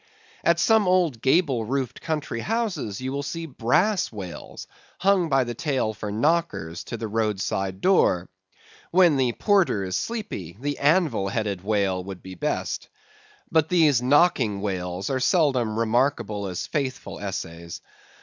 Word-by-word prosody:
At 170 Hz, 0 st, +3 dB
some 220 Hz, +1 st, +4 dB
old 175 Hz, -10 st, +2 dB
gable 135 Hz, -3 st, +2 dB
roofed 130 Hz, +2 st, -3 dB
country 150 Hz, -7 st, -3 dB
houses 180 Hz, -, -2 dB
you 130 Hz, +1 st, -3 dB
will 140 Hz, +1 st, -2 dB
see 165 Hz, +4 st, -5 dB
brass 165 Hz, -, +1 dB
whales 95 Hz, -6 st, -8 dB, 0.3 s
hung 190 Hz, -3 st, +2 dB
by 135 Hz, -2 st, +3 dB
the 120 Hz, -1 st, -4 dB
tail 130 Hz, -4 st, -1 dB
for 105 Hz, -1 st, -5 dB
knockers 115 Hz, -, 0 dB
to 120 Hz, -, -5 dB
the 110 Hz, 0 st, -4 dB
road 110 Hz, -2 st, -1 dB
side 95 Hz, -1 st, -2 dB
door. 95 Hz, -, +3 dB, 0.6 s
When 175 Hz, -3 st, +5 dB
the 130 Hz, -3 st, +1 dB
porter 190 Hz, -, +2 dB
is 95 Hz, -1 st, -3 dB
sleepy, 210 Hz, -, -4 dB
the 145 Hz, +2 st, -3 dB
anvil 145 Hz, -, +2 dB
headed 100 Hz, -3 st, -2 dB
whale 100 Hz, -3 st, 0 dB
would 95 Hz, -1 st, -8 dB
be 95 Hz, -, -8 dB
best. 90 Hz, -, -3 dB, 0.6 s
But 160 Hz, -1 st, +3 dB
these 155 Hz, -8 st, +4 dB
knocking 130 Hz, -, +3 dB
whales 95 Hz, -1 st, -3 dB
are 130 Hz, -, 0 dB
seldom 130 Hz, -6 st, +2 dB
remarkable 115 Hz, -3 st, 0 dB
as 90 Hz, -2 st, -4 dB
faithful 135 Hz, -4 st, -3 dB
essays. 85 Hz, -4 st, -6 dB
125 Hz, 150 wpm, -25 LUFS, 100-160 Hz, 0.6 s, When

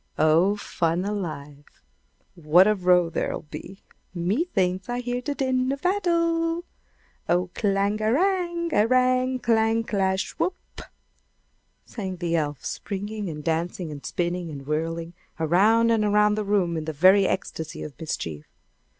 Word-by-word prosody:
Oh, 165 Hz, +6 st, +4 dB
fun 175 Hz, -3 st, -1 dB
alive! 150 Hz, -8 st, -6 dB, 0.5 s
What 170 Hz, +3 st, +5 dB
a 215 Hz, -, +4 dB
row 180 Hz, -3 st, +3 dB
there'll -, -, -2 dB
be! 185 Hz, +5 st, -10 dB, 0.3 s
Me 190 Hz, -, 0 dB
thinks 185 Hz, -, -1 dB
I 245 Hz, 0 st, -1 dB
hear 245 Hz, 0 st, -3 dB
the 285 Hz, +3 st, -3 dB
din 260 Hz, -1 st, 0 dB
of 275 Hz, 0 st, -5 dB
battle! 335 Hz, -2 st, +1 dB, 0.6 s
"Oh 180 Hz, +1 st, +1 dB
clanga 205 Hz, +1 st, 0 dB
a -, -, +2 dB
rang! 345 Hz, +1 st, 0 dB
a 215 Hz, -4 st, +4 dB
rang! 255 Hz, +1 st, +2 dB
clang! 225 Hz, -1 st, +2 dB
clash! 190 Hz, -3 st, -1 dB
Whoop!" 365 Hz, -, -4 dB, 1.0 s
sang 190 Hz, -4 st, -5 dB
the 170 Hz, -1 st, -2 dB
elf, 145 Hz, -4 st, -2 dB
springing 205 Hz, 0 st, -4 dB
and 150 Hz, -2 st, -7 dB
dancing, 165 Hz, +1 st, -2 dB
and 145 Hz, -1 st, -8 dB
spinning, 175 Hz, 0 st, -2 dB
and 140 Hz, -3 st, -8 dB
whirling, 165 Hz, +3 st, -3 dB, 0.3 s
around 210 Hz, +8 st, +4 dB
and 225 Hz, -2 st, +2 dB
around 210 Hz, 0 st, +3 dB
the 215 Hz, 0 st, -1 dB
room 190 Hz, -5 st, +1 dB
in 155 Hz, -, -4 dB
the 160 Hz, -, -3 dB
very 190 Hz, +6 st, +5 dB
ecstasy 160 Hz, -4 st, -4 dB
of 150 Hz, -, -7 dB
mischief. 80 Hz, -, -5 dB
195 Hz, 145 wpm, -25 LUFS, 170-235 Hz, 1.0 s, What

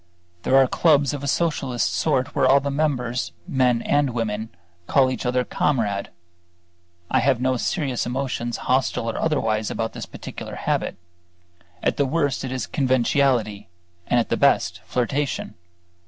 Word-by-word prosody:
There 135 Hz, -, +3 dB
are 135 Hz, -, +7 dB
clubs 145 Hz, 0 st, +3 dB
of 145 Hz, -, -4 dB
a 140 Hz, -, -4 dB
Socialist 135 Hz, -6 st, 0 dB
sort 145 Hz, -3 st, 0 dB
where 130 Hz, -, +3 dB
all 135 Hz, +2 st, +6 dB
the 140 Hz, 0 st, -3 dB
members, 130 Hz, -5 st, -1 dB
men 125 Hz, -3 st, +2 dB
and 145 Hz, -4 st, +1 dB
women, 110 Hz, -1 st, -2 dB, 0.4 s
call 130 Hz, -2 st, +3 dB
each 130 Hz, -, -3 dB
other 125 Hz, 0 st, +1 dB
"Comrade." 110 Hz, -9 st, -1 dB, 1.0 s
I -, -, +4 dB
have 130 Hz, -1 st, +2 dB
no 130 Hz, +1 st, +1 dB
serious 135 Hz, -2 st, -1 dB
emotions, 125 Hz, -2 st, -2 dB
hostile 130 Hz, -2 st, +1 dB
or -, -, -5 dB
otherwise, 110 Hz, -9 st, 0 dB
about 115 Hz, 0 st, -3 dB
this -, -, -6 dB
particular -, -, -8 dB
habit: -, -, -2 dB, 0.9 s
at -, -, +1 dB
the 140 Hz, -, +2 dB
worst 145 Hz, -3 st, 0 dB
it 130 Hz, -, -4 dB
is 130 Hz, -1 st, -2 dB
conventionality, 125 Hz, -, +1 dB, 0.4 s
and 120 Hz, -, +3 dB
at 115 Hz, -, -1 dB
the -, -, +1 dB
best -, -, +2 dB
flirtation. 135 Hz, -1 st, -2 dB
130 Hz, 155 wpm, -23 LUFS, 120-140 Hz, 1.0 s, are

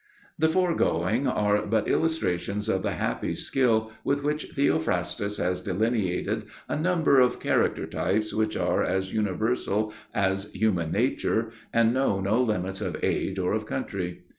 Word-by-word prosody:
The 160 Hz, +1 st, +4 dB
foregoing 140 Hz, -, +1 dB
are 105 Hz, 0 st, +2 dB
but 110 Hz, +1 st, +1 dB
illustrations 105 Hz, -, 0 dB
of 95 Hz, -4 st, +1 dB
the -, -, -1 dB
happy -, -, -2 dB
skill 110 Hz, -4 st, +1 dB
with 140 Hz, 0 st, 0 dB
which 150 Hz, +1 st, -1 dB
Theophrastus 105 Hz, -6 st, 0 dB
has 90 Hz, 0 st, -1 dB
delineated 100 Hz, -1 st, -1 dB, 0.2 s
a -, -, -2 dB
number 160 Hz, -3 st, +3 dB
of 125 Hz, -1 st, +3 dB
character -, -, +1 dB
types 110 Hz, +3 st, -1 dB
which 110 Hz, 0 st, 0 dB
are -, -, +1 dB
as 95 Hz, +1 st, -1 dB
universal 110 Hz, 0 st, 0 dB, 0.2 s
as 100 Hz, +1 st, 0 dB
human 90 Hz, -6 st, 0 dB
nature 115 Hz, -1 st, 0 dB, 0.2 s
and 115 Hz, 0 st, +3 dB
know 130 Hz, -7 st, +1 dB
no 100 Hz, +5 st, +2 dB
limits 95 Hz, -4 st, -1 dB
of 90 Hz, -6 st, -3 dB
age 95 Hz, -, 0 dB
or 90 Hz, 0 st, 0 dB
of 110 Hz, 0 st, -2 dB
country. 95 Hz, -9 st, -4 dB
110 Hz, 145 wpm, -26 LUFS, 95-125 Hz, 0.2 s, The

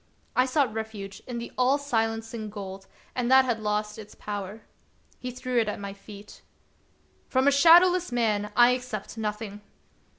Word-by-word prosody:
I 255 Hz, +1 st, +3 dB
sought 265 Hz, -4 st, +1 dB
refuge 215 Hz, -3 st, -6 dB
in 245 Hz, -2 st, -5 dB
the 235 Hz, -, -6 dB
all 260 Hz, +3 st, +4 dB
silencing 225 Hz, -4 st, -2 dB
gold, 195 Hz, -2 st, -8 dB, 0.3 s
and 250 Hz, -1 st, -1 dB
that 265 Hz, 0 st, +7 dB
had 240 Hz, -3 st, -1 dB
lost 210 Hz, 0 st, -2 dB
its 210 Hz, -1 st, -11 dB
power. 205 Hz, +1 st, -6 dB, 0.6 s
He 255 Hz, -, -5 dB
threw 250 Hz, 0 st, -1 dB
it 220 Hz, -2 st, +1 dB
at -, -, -4 dB
my 200 Hz, -1 st, -6 dB
feet. 200 Hz, +1 st, -13 dB, 0.4 s
" -, -, -38 dB
From 260 Hz, +1 st, +2 dB
a -, -, +7 dB
shadowless 345 Hz, +4 st, +6 dB
man 210 Hz, -4 st, 0 dB
I 240 Hz, 0 st, +7 dB
accept 245 Hz, -6 st, -4 dB
nothing 210 Hz, -1 st, -4 dB
225 Hz, 165 wpm, -27 LUFS, 210-255 Hz, 0.6 s, that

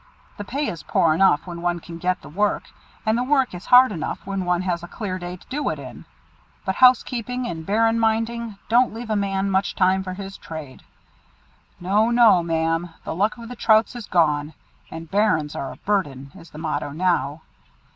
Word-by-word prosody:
The 205 Hz, -, -5 dB
pay 275 Hz, +8 st, -2 dB
is 165 Hz, -, -5 dB
poor 170 Hz, -5 st, +2 dB
enough 165 Hz, -3 st, +3 dB
when 170 Hz, -2 st, -7 dB
one 175 Hz, 0 st, 0 dB
can 165 Hz, 0 st, -10 dB
get 180 Hz, +1 st, -1 dB
the -, -, -10 dB
work, 205 Hz, +7 st, 0 dB, 0.4 s
and 220 Hz, 0 st, +2 dB
the 245 Hz, -, 0 dB
work 265 Hz, -3 st, +2 dB
is 180 Hz, +1 st, -9 dB
hard 250 Hz, -1 st, +7 dB
enough 170 Hz, -6 st, -4 dB
when 195 Hz, -1 st, -3 dB
one 180 Hz, 0 st, +1 dB
has 175 Hz, -2 st, -1 dB
a 175 Hz, -, -8 dB
clear 185 Hz, -1 st, -5 dB
day 175 Hz, 0 st, -6 dB
to -, -, -20 dB
do 290 Hz, +2 st, -2 dB
it -, -, -3 dB
in; -, -, -10 dB, 0.6 s
but 190 Hz, -, 0 dB
housekeeping 250 Hz, +1 st, +3 dB
and 160 Hz, -8 st, -6 dB
bairn 225 Hz, +2 st, +2 dB
minding 225 Hz, -1 st, -1 dB
don't 240 Hz, 0 st, +3 dB
leave 230 Hz, -1 st, -6 dB
a -, -, +2 dB
man 195 Hz, -1 st, 0 dB
much 190 Hz, +1 st, 0 dB
time 190 Hz, 0 st, +3 dB
for 185 Hz, -1 st, -6 dB
his 195 Hz, 0 st, -8 dB
trade. 155 Hz, -5 st, -9 dB, 1.0 s
No! 205 Hz, +5 st, +2 dB
no! 235 Hz, -6 st, +6 dB
Ma'am, 165 Hz, +1 st, -1 dB
the -, -, -4 dB
luck 205 Hz, +7 st, 0 dB
of 230 Hz, -1 st, -9 dB
the 250 Hz, -, -8 dB
Trouts 220 Hz, 0 st, +3 dB
is 235 Hz, -3 st, -7 dB
gone, 150 Hz, -3 st, +1 dB, 0.3 s
and 165 Hz, 0 st, -8 dB
'Bairns 195 Hz, -8 st, +1 dB
are 135 Hz, -, -4 dB
a -, -, -10 dB
burden,' 145 Hz, -10 st, -2 dB
is 170 Hz, -3 st, -14 dB
the -, -, -12 dB
motto 155 Hz, -2 st, -3 dB
now. 155 Hz, -2 st, 0 dB
190 Hz, 200 wpm, -23 LUFS, 170-225 Hz, 1.0 s, hard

